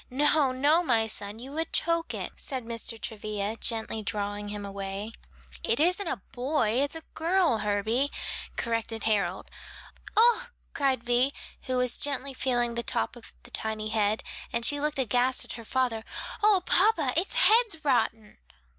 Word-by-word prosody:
"No, 290 Hz, +1 st, +3 dB
no, 290 Hz, +6 st, +3 dB
my 235 Hz, -9 st, +2 dB
son, 205 Hz, -1 st, -1 dB
you 255 Hz, +4 st, -9 dB
would 325 Hz, +2 st, -2 dB
choke 335 Hz, 0 st, 0 dB
it," -, -, -4 dB
said 260 Hz, -4 st, -4 dB
Mr. 230 Hz, 0 st, -2 dB
Travilla, 215 Hz, -1 st, -3 dB
gently 225 Hz, -1 st, -1 dB
drawing 205 Hz, 0 st, -3 dB
him 205 Hz, 0 st, -5 dB
away. 200 Hz, +2 st, -5 dB, 0.5 s
"It 230 Hz, -, +1 dB
isn't 360 Hz, +4 st, +3 dB
a 195 Hz, -, -3 dB
boy; 255 Hz, -2 st, 0 dB
it's 285 Hz, +2 st, -1 dB
a 325 Hz, -, -8 dB
girl, 330 Hz, -, +2 dB
Herbie," 215 Hz, +6 st, 0 dB, 0.5 s
corrected 230 Hz, -1 st, -2 dB
Harold. 215 Hz, -2 st, 0 dB, 0.7 s
"Oh!" 480 Hz, +2 st, +5 dB, 0.3 s
cried 265 Hz, -4 st, +1 dB
Vi, 245 Hz, +3 st, +3 dB, 0.4 s
who 255 Hz, -1 st, 0 dB
was 250 Hz, -1 st, +1 dB
gently 280 Hz, -1 st, 0 dB
feeling 245 Hz, -2 st, +1 dB
the 235 Hz, -, -1 dB
top 235 Hz, -, -2 dB
of 240 Hz, -, -13 dB
the 240 Hz, -, -13 dB
tiny 220 Hz, -1 st, -3 dB
head, 215 Hz, -1 st, +1 dB, 0.3 s
and 235 Hz, 0 st, 0 dB
she 290 Hz, +3 st, +5 dB
looked 300 Hz, 0 st, -1 dB
aghast 250 Hz, 0 st, +2 dB
at -, -, -10 dB
her 230 Hz, -, -7 dB
father, 240 Hz, -2 st, -1 dB, 0.4 s
"O, 415 Hz, -4 st, +4 dB
papa, 345 Hz, -, +3 dB
its 350 Hz, +9 st, +1 dB
head's 450 Hz, -9 st, +4 dB
rotten!" 225 Hz, -5 st, 0 dB
245 Hz, 160 wpm, -28 LUFS, 220-295 Hz, 0.7 s, Oh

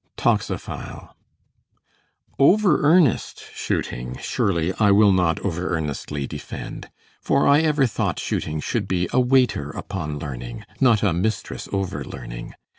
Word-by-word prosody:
Toxophile -, -, -2 dB, 1.3 s
Over 185 Hz, +3 st, +5 dB
earnest 155 Hz, -, +3 dB
shooting 60 Hz, +1 st, -3 dB
surely 85 Hz, -2 st, 0 dB
I 105 Hz, -2 st, +5 dB
will 100 Hz, +1 st, +6 dB
not 90 Hz, -3 st, +2 dB
over 90 Hz, -2 st, -2 dB
earnestly 75 Hz, -2 st, -4 dB
defend; -, -, -7 dB, 0.3 s
for -, -, +2 dB
I 140 Hz, +1 st, +6 dB
ever 150 Hz, -3 st, +3 dB
thought 115 Hz, -, -1 dB
shooting 75 Hz, 0 st, -2 dB
should -, -, -2 dB
be 90 Hz, -1 st, 0 dB
a 130 Hz, -, +4 dB
waiter 125 Hz, -, +2 dB
upon 75 Hz, -3 st, -5 dB
learning, 60 Hz, -5 st, -7 dB
not 115 Hz, -5 st, +4 dB
a 100 Hz, -5 st, +3 dB
mistress 100 Hz, +6 st, -2 dB
over 95 Hz, -2 st, -2 dB
learning. -, -, -8 dB
95 Hz, 125 wpm, -23 LUFS, 75-125 Hz, 1.3 s, will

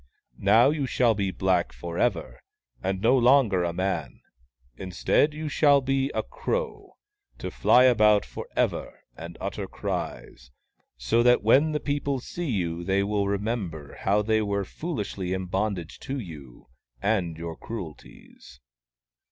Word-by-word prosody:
" -, -, -39 dB, 0.2 s
Now 120 Hz, +5 st, +6 dB
you 145 Hz, -3 st, -2 dB
shall 120 Hz, -2 st, +3 dB
be 100 Hz, -2 st, -1 dB
black 95 Hz, -1 st, 0 dB
for 85 Hz, 0 st, -6 dB
ever, 100 Hz, -10 st, -1 dB, 0.4 s
and 95 Hz, 0 st, -2 dB
no 120 Hz, +4 st, +4 dB
longer 120 Hz, -7 st, +4 dB
a 85 Hz, -, 0 dB
man. 95 Hz, +3 st, -3 dB, 0.5 s
Instead, 95 Hz, -, +1 dB
you 155 Hz, 0 st, -4 dB
shall 145 Hz, -1 st, +4 dB
be 135 Hz, 0 st, 0 dB
a -, -, 0 dB
crow, -, -, -4 dB, 0.4 s
to -, -, -5 dB
fly 125 Hz, -, +5 dB
about 105 Hz, -5 st, +5 dB
for -, -, -8 dB
ever -, -, -1 dB
and 85 Hz, +1 st, -9 dB
utter -, -, -4 dB
cries, -, -, -5 dB, 0.5 s
so 65 Hz, -, +1 dB
that 125 Hz, -2 st, +4 dB
when 140 Hz, +8 st, +4 dB
the 150 Hz, -, -1 dB
people 140 Hz, -2 st, -1 dB
see 170 Hz, +5 st, -5 dB
you 85 Hz, -6 st, -2 dB
they 95 Hz, +2 st, +1 dB
will 100 Hz, 0 st, 0 dB
remember 100 Hz, -7 st, -3 dB
how 105 Hz, +2 st, +2 dB
they 110 Hz, +1 st, +2 dB
were 100 Hz, -1 st, -1 dB
foolishly 100 Hz, -, -4 dB
in 95 Hz, 0 st, -3 dB
bondage 95 Hz, -2 st, -3 dB
to 135 Hz, -, -5 dB
you 75 Hz, -, -10 dB, 0.3 s
and 90 Hz, -, 0 dB
your 85 Hz, -1 st, -6 dB
cruelties." 80 Hz, -, -10 dB
105 Hz, 150 wpm, -26 LUFS, 90-130 Hz, 0.5 s, Now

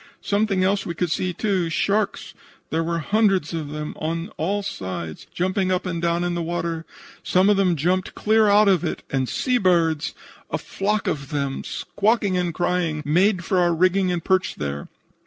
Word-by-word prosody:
"Something 200 Hz, -2 st, +1 dB
else 195 Hz, +1 st, +2 dB
we 170 Hz, -, -5 dB
could 175 Hz, 0 st, -1 dB
see, 185 Hz, +2 st, 0 dB
too. 185 Hz, -2 st, 0 dB
Sharks! 200 Hz, +6 st, 0 dB, 0.4 s
There 165 Hz, +1 st, +1 dB
were 170 Hz, +1 st, -1 dB
hundreds 195 Hz, -2 st, +1 dB
of 155 Hz, -3 st, -3 dB
them 150 Hz, 0 st, -5 dB
on 165 Hz, +2 st, -3 dB
all 200 Hz, +6 st, -2 dB
sides, 90 Hz, -, -5 dB
jumping 185 Hz, +1 st, 0 dB
up 185 Hz, 0 st, 0 dB
and 170 Hz, -2 st, -3 dB
down 170 Hz, 0 st, +1 dB
in 175 Hz, 0 st, -1 dB
the 175 Hz, -, -2 dB
water. 165 Hz, -1 st, -3 dB, 0.4 s
Some 190 Hz, +3 st, +3 dB
of -, -, +4 dB
them 185 Hz, -3 st, +3 dB
jumped 180 Hz, +5 st, 0 dB
clear 220 Hz, 0 st, +3 dB
out 205 Hz, +1 st, +5 dB
of 185 Hz, -3 st, +3 dB
it. 165 Hz, -, -3 dB
And 130 Hz, -2 st, 0 dB
sea 250 Hz, -1 st, +1 dB
birds! 170 Hz, -4 st, +2 dB, 0.3 s
A -, -, -1 dB
flock 210 Hz, +1 st, -2 dB
of 140 Hz, -3 st, -2 dB
them, 140 Hz, -2 st, -2 dB
squawking 205 Hz, -2 st, 0 dB
and 180 Hz, -1 st, 0 dB
crying, 170 Hz, -3 st, -1 dB
made 180 Hz, +4 st, +2 dB
for 185 Hz, -, +1 dB
our 175 Hz, -1 st, +3 dB
rigging 185 Hz, +2 st, +2 dB
and 175 Hz, -2 st, -2 dB
perched 190 Hz, -1 st, +1 dB
there. 70 Hz, 0 st, -4 dB
180 Hz, 185 wpm, -23 LUFS, 160-195 Hz, 0.4 s, out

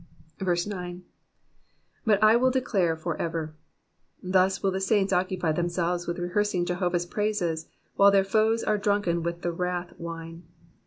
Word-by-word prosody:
9. 180 Hz, -3 st, -6 dB, 1.0 s
But 210 Hz, -1 st, +4 dB
I 215 Hz, +1 st, +7 dB
wUl 255 Hz, +2 st, +4 dB
declare 200 Hz, -10 st, +1 dB
for 160 Hz, 0 st, -3 dB
ever.^^ 160 Hz, -2 st, -3 dB, 0.7 s
Thus 185 Hz, +1 st, +2 dB
will 195 Hz, -, +2 dB
the 190 Hz, +1 st, -2 dB
saints 195 Hz, -1 st, +2 dB
occupy 180 Hz, -2 st, 0 dB
themselves 175 Hz, +1 st, -1 dB
with 170 Hz, +1 st, -2 dB
rehearsing 180 Hz, +1 st, 0 dB
Jehovah's 175 Hz, -1 st, -1 dB
praises, 175 Hz, -5 st, -1 dB, 0.3 s
while 200 Hz, 0 st, +7 dB
their 200 Hz, -1 st, +4 dB
foes 220 Hz, +3 st, +2 dB
are 210 Hz, -1 st, +1 dB
drunken 200 Hz, -4 st, +1 dB
with 170 Hz, +1 st, -4 dB
the 175 Hz, -, 0 dB
wrath 180 Hz, 0 st, -3 dB
wine. 165 Hz, 0 st, -7 dB
180 Hz, 145 wpm, -27 LUFS, 170-200 Hz, 1.0 s, I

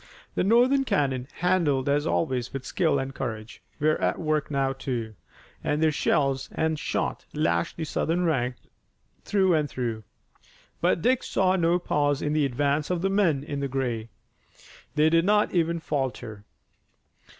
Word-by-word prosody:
The -, -, 0 dB
Northern 245 Hz, +7 st, +4 dB
cannon, 135 Hz, -, 0 dB
handled 165 Hz, -7 st, +1 dB
as 145 Hz, +2 st, +1 dB
always 130 Hz, -6 st, -1 dB
with 135 Hz, -2 st, -6 dB
skill 160 Hz, -6 st, +1 dB
and 135 Hz, 0 st, -3 dB
courage, 110 Hz, -4 st, -6 dB, 0.2 s
were 155 Hz, +1 st, +2 dB
at -, -, +1 dB
work 155 Hz, -2 st, -1 dB
now, 135 Hz, -2 st, 0 dB
too, 120 Hz, -4 st, -4 dB, 0.5 s
and 150 Hz, -, 0 dB
their 160 Hz, 0 st, +3 dB
shells 135 Hz, -2 st, 0 dB
and 160 Hz, -1 st, 0 dB
shot -, -, -2 dB
lashed 85 Hz, 0 st, 0 dB
the 165 Hz, -, -3 dB
Southern 165 Hz, +3 st, 0 dB
ranks 125 Hz, -6 st, 0 dB, 0.6 s
through 190 Hz, -3 st, +2 dB
and 150 Hz, -2 st, +1 dB
through. 115 Hz, -4 st, -3 dB, 0.8 s
But 165 Hz, -, +2 dB
Dick 255 Hz, 0 st, +3 dB
saw 190 Hz, -1 st, +1 dB
no 170 Hz, -1 st, +3 dB
pause 145 Hz, -4 st, 0 dB
in 150 Hz, -, 0 dB
the 155 Hz, -2 st, +2 dB
advance 145 Hz, +3 st, 0 dB
of 180 Hz, -1 st, -1 dB
the 195 Hz, -, +1 dB
men 170 Hz, -9 st, +2 dB
in 145 Hz, -1 st, -4 dB
gray. 125 Hz, -4 st, -2 dB, 0.9 s
They 155 Hz, +1 st, +4 dB
did 165 Hz, 0 st, +4 dB
not 210 Hz, +2 st, +2 dB
even 170 Hz, -1 st, +1 dB
falter. 130 Hz, -9 st, -4 dB
150 Hz, 155 wpm, -26 LUFS, 135-170 Hz, 0.9 s, Northern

